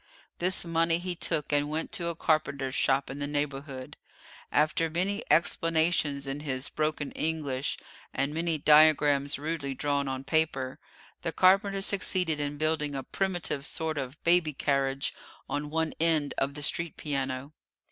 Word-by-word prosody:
This 180 0 +1
money 165 0 +2
he 180 +1 -3
took 160 -3 -2
and 145 0 +2
went 155 +1 -2
to 175 -6 -1
a 170 - -2
carpenter's 140 -5 0
shop 135 0 +2
in 140 - -7
the 145 - -2
neighbourhood. 140 -2 -4 0.5
After 155 +2 +2
many 185 +5 -1
explanations 160 -4 +2
in 135 +1 -3
his 135 -2 -2
broken 155 -2 -2
English, 150 -4 -2 0.3
and 140 +2 -1
many 165 0 0
diagrams 150 -2 +5
rudely 145 -2 -3
drawn 140 0 0
on 130 0 -3
paper, 135 -3 0 0.4
the - - -2
carpenter 195 +1 +3
succeeded 185 -5 +1
in 145 0 -2
building 150 -2 0
a 135 - -3
primitive 175 -7 -2
sort 155 0 -1
of 135 +2 -5
baby 170 -2 +3
carriage 135 0 0 0.3
on 145 0 -3
one 160 +1 0
end 160 -3 +2
of 140 +1 -1
the 150 - -5
street 165 +2 0
piano. 135 -1 -3
150 Hz, 150 wpm, -29 LUFS, 140-165 Hz, 0.5 s, diagrams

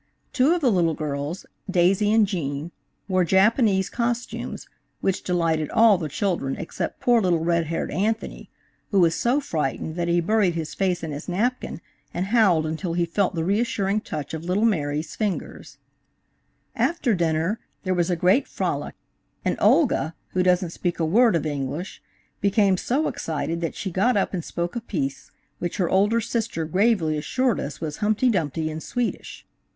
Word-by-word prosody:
Two 285 +5 +4
of 350 - -2
the 255 -5 +3
little 170 -5 +2
girls, 150 +3 -4 0.2
Daisy 190 +3 +3
and 220 -1 +5
Jean, 160 -4 -3 0.4
wore 185 -2 +2
Japanese 195 - +3
cos 240 0 -1
tumes, - - -7 0.3
which 195 -1 0
delighted 165 -4 0
all 220 -4 +5
the 155 -3 -3
children 155 -4 -1
except 180 -5 -5
poor 240 -2 +3
little 175 -4 +2
red 170 -1 +2
haired 165 - -2
Anthony, 215 +7 -2 0.4
who 200 - +2
was 170 -2 +4
so 245 - +1
frightened 155 - -3
that 170 -1 -1
he 175 0 +3
buried 190 0 +2
his 160 -2 -4
face 185 -3 0
in 160 - -3
his 145 +4 -6
napkin 215 -2 -1 0.3
and 180 +2 -1
howled 195 -7 +3
until 160 +2 -3
he 175 0 +1
felt 185 +2 0
the 165 - -1
reassuring 200 +1 0
touch 150 -8 -6
of 160 0 -4
little 185 +5 +1
Mary's 150 -6 -1
fingers. 210 -4 -4
DAISY - - -30 1.0
AND - - +1
JEAN. - - +1
After 275 -9 0
dinner 170 +4 0 0.2
there 185 -1 0
was 175 0 +1
a 175 - +2
great 185 - +3
frolic, - - -3 0.5
and - - +1
Olga, 200 - +3
who 185 - 0
doesn't 180 -1 +2
speak 175 0 -3
a 165 - +2
word 225 +6 +4
of 160 - 0
English, 145 +4 -4 0.4
became 200 -1 +3
so 270 - 0
excited 165 +1 -3
that 165 - -3
she 190 - -4
got 205 +7 +2
up 200 - 0
and 175 -3 -2
spoke 170 +4 -4
a 235 - -2
piece, 140 - -4 0.3
which 175 - -3
her 180 -3 0
older 205 +5 +3
sister 225 -7 -2
gravely 175 -3 +2
assured 255 - 0
us 140 +1 -5
was 150 -2 -4
Humpty 215 +4 +2
Dumpty 160 -4 -1
in 155 +1 -6
Swedish. 245 +4 -4
180 Hz, 180 wpm, -24 LUFS, 160-215 Hz, 1.0 s, and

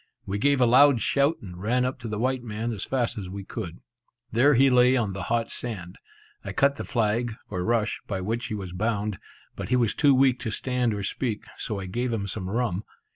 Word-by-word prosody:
We 100 +1 -2
gave 140 +3 +3
a 125 - +5
loud 130 +2 +6
shout, 140 +7 +2
and 90 -2 -9
ran 125 +5 +1
up 130 0 -3
to 120 - -6
the 105 -1 -3
white 130 +3 0
man 115 0 -3
as 100 - -4
fast 120 -4 -1
as 95 -3 -6
we 100 +1 -6
could. 95 -4 -7 0.5
There 135 +5 +5
he 135 +3 +6
lay 125 +1 +5
on 105 -5 0
the 95 - -5
hot 115 0 0
sand. 95 -7 -6 0.4
I - - -5
cut 140 0 +3
the - - -4
flag, 115 -1 0 0.2
or 90 -3 -2
rush, 115 0 0
by 95 -3 -2
which 115 +5 -2
he 110 - -3
was 95 -4 -6
bound, 105 +1 -1 0.4
but - - -6
he 125 - +3
was 120 -4 +2
too 145 -3 +4
weak 130 -1 +4
to 120 - -3
stand 125 -1 0
or 100 - -4
speak, 110 +2 -2
so 105 -3 -4
I 95 - -5
gave 120 +7 -2
him 110 -3 -1
some 95 -1 -4
rum. 110 -3 -1
115 Hz, 230 wpm, -26 LUFS, 100-125 Hz, 0.5 s, loud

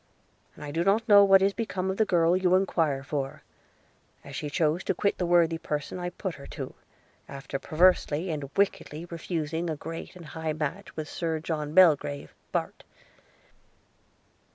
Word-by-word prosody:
I 145 - -7
do 165 +3 0
not 210 +5 +2
know 205 -2 +8
what 195 -1 +6
is 195 0 +3
become 190 -4 -2
of 190 - -5
the 220 - +3
girl 170 -1 +3
you 185 -1 +3
enquire 165 -7 +1
for, 140 -1 -4 0.8
as 140 - -9
she 150 +3 -4
chose 160 +2 +1
to - - 0
quit 200 - 0
the 180 - 0
worthy 170 -1 +3
person 150 +4 -4
I 175 0 -3
put 190 0 -5
her 140 - -11
to, - - -7 0.6
after 135 0 -5
perversely 170 +1 +2
and 145 -3 -4
wickedly 175 -5 0
refusing 165 -1 -3
a 160 - -1
great 165 +4 -8
and 175 -2 -11
high 160 0 -4
match 155 +6 -4
with 155 -1 -4
Sir 160 +1 -2
John 155 -1 -4
Belgrave, 150 -5 +4 0.2
Bart. - - -3
165 Hz, 165 wpm, -27 LUFS, 150-185 Hz, 0.8 s, know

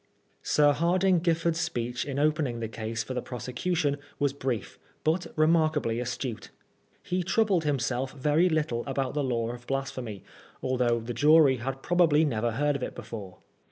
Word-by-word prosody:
Sir 145 -1 +4
Hardinge 175 +3 +2
Giffard's 165 -1 +1
speech 120 -5 -2
in 140 -1 -4
opening 145 -5 +1
the 115 - -3
case 115 +1 -4
for 130 - -5
the 125 - -2
prosecution 140 +6 -2 0.2
was 145 -1 +1
brief, 130 -5 -4 0.2
but 165 +3 +1
remarkably 155 -7 +2
astute. 125 -1 -4 0.5
He 180 0 -1
troubled 185 -1 +2
himself 130 -2 -1
very 150 +5 +2
little 150 -7 0
about 135 -1 -1
the 145 0 0
law 120 -3 -1
of 120 0 -10
Blas 135 0 -1
phemy, 110 -6 -7 0.4
although 125 -2 +1
the 115 +2 -5
jury 150 -1 +5
had 135 +3 -5
probably 165 -3 +4
never 120 -4 0
heard 145 +4 +1
of 140 - -3
it - - -4
before. 100 -5 -8
135 Hz, 160 wpm, -28 LUFS, 120-155 Hz, 0.5 s, jury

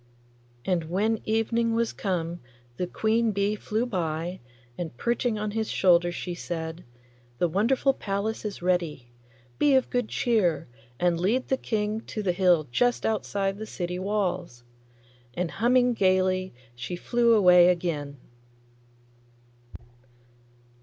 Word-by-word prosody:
And 180 -4 0
when 210 +7 0
evening 225 +1 +1
was 230 0 0
come 175 -3 -2 0.4
the 180 - -2
queen 220 +4 +1
bee 200 +1 +1
flew 215 +3 -2
by, 175 -4 -3 0.4
and 160 -7 -6
perching 235 - 0
on 210 0 -2
his 220 0 -2
shoulder 175 -2 +3
she 175 0 -5
said, 165 -1 -5 0.5
'The 175 - +2
wonderful 240 - +2
palace 205 0 -3
is 205 -4 -5
ready. 165 -9 -1 0.5
Be 285 -2 +4
of 260 - +2
good 245 -3 0
cheer, 205 -10 +1 0.3
and 175 -1 +2
lead 225 +9 0
the 265 - +3
King 215 -3 -2
to 215 - -4
the 185 - +2
hill 175 -4 +3
just 245 - +1
outside 200 -2 -1
the 220 - -6
city 180 -2 -4
walls.' 185 -10 -2 0.7
And 175 -1 -2
humming 245 +3 +3
gaily 185 - +1 0.2
she 120 +8 -5
flew 235 +5 +2
away 180 -4 +7
again. 165 -5 -1
190 Hz, 130 wpm, -26 LUFS, 175-220 Hz, 0.7 s, away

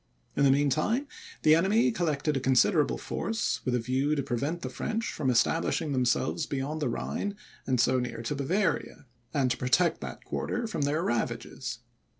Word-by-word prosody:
In 140 - +3
the - - +6
mean 140 +1 +3
time, 225 - +1 0.4
the 155 - +7
enemy 210 +9 +4
collected 155 -7 0
a - - +1
considerable 135 +4 +3
force, 225 -1 -2
with 125 - 0
a - - +2
view 130 +5 0
to 140 - -1
prevent 145 +9 -2
the 130 - -3
French 225 - -2
from 140 -4 -1
establishing 150 +5 +1
themselves 130 +4 +1
beyond 145 +3 -3
the 140 - +1
Rhine 200 - -3 0.3
and 130 -2 +1
so 130 +2 +3
near 125 -2 -4
to 115 - -2
Bavaria, 165 +3 -1 0.3
and 135 -4 +1
to 120 - 0
protect 165 +7 +2
that - - -7
quarter 240 0 -2
from 220 -8 -3
their 145 +4 +1
ravages. 120 -9 -3
145 Hz, 175 wpm, -29 LUFS, 130-170 Hz, 0.4 s, the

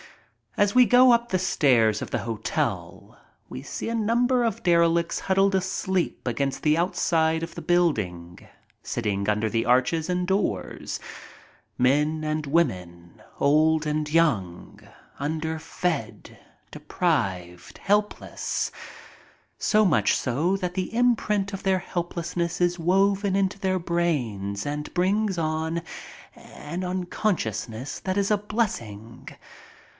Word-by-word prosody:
As 205 +1 +2
we 250 0 +7
go 250 +3 +6
up 235 0 +1
the 185 - 0
steps 125 - +2
of - - -5
the - - 0
hotel 115 -2 -3 0.3
we 130 - -7
see 140 - -6
a 230 - -2
number 240 +3 +2
of 225 -4 -2
derelicts 170 -1 +2
huddled 195 +1 +2
asleep 190 -4 -2
against 135 +3 -2
the 150 0 +4
outside 160 -2 +1
of 165 - -6
the - - -6
building, 100 - 0 0.4
sitting 105 -3 -2
under 105 +1 +1
the 115 +1 -1
arches 130 +7 +2
and 180 0 -1
doors, 195 +1 -2 0.8
men 150 +5 +2
and 155 -1 -2
women, 90 - -2 0.2
old 155 +2 +3
and 150 0 -1
young, 115 - 0 0.4
underfed, 155 - -3 0.4
deprived, 95 - -2
helpless, 210 +1 -1 0.9
so 215 -1 +3
much 180 - +3
so 155 +10 0
that 180 -2 -3
the 185 +3 -3
imprint 215 -4 +1
of 195 - -5
helplessness 175 -2 -2
is 175 0 +1
woven 195 +3 +2
into 195 0 0
their 185 -1 0
brain 140 - -1
and 150 +1 -4
brings 195 +2 +1
on 160 +1 -1 0.5
an 170 +5 -8
unconsciousness 160 - -3
that 190 0 -3
is 200 +1 +1
a 210 - +4
blessing. 120 - -4
170 Hz, 120 wpm, -25 LUFS, 130-190 Hz, 0.9 s, we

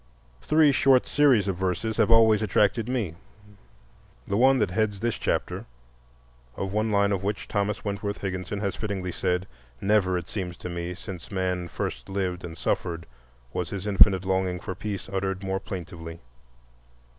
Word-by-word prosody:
Three 155 -1 +5
short 135 -2 +4
series 130 -9 +4
of 95 -3 -1
verses 95 +4 -1
have - - +3
always 110 -2 +6
attracted 105 +2 +2
me,—the 90 - -7
one 130 +4 +5
that 105 -6 +1
heads 105 0 0
this 115 +1 -1
chapter, - - -1 0.9
of 95 0 -3
one 110 +1 +1
line 100 0 +3
of 100 -2 0
which 100 +2 -3
Thomas 105 +1 -1
Wentworth 100 0 -2
Higginson 95 +1 -4
has 100 -2 -1
fittingly 95 -4 -3
said, 90 0 -1 0.3
"Never, 95 -3 +2
it 90 -1 -5
seems 90 -4 -4
to - - -6
me, 85 +1 -4
since 90 -2 -8
man 90 -2 -1
first 85 - -5
lived 95 -2 -2
and 85 -2 -7
suffered 85 0 -2 0.5
was 90 -3 -2
his 100 -1 -5
infinite 95 -2 +5
longing 95 -1 0
for 95 - -5
peace 100 +1 -5
uttered 95 0 -2
more 95 0 -1
plaintively." 85 -3 -7
95 Hz, 155 wpm, -26 LUFS, 90-105 Hz, 0.9 s, always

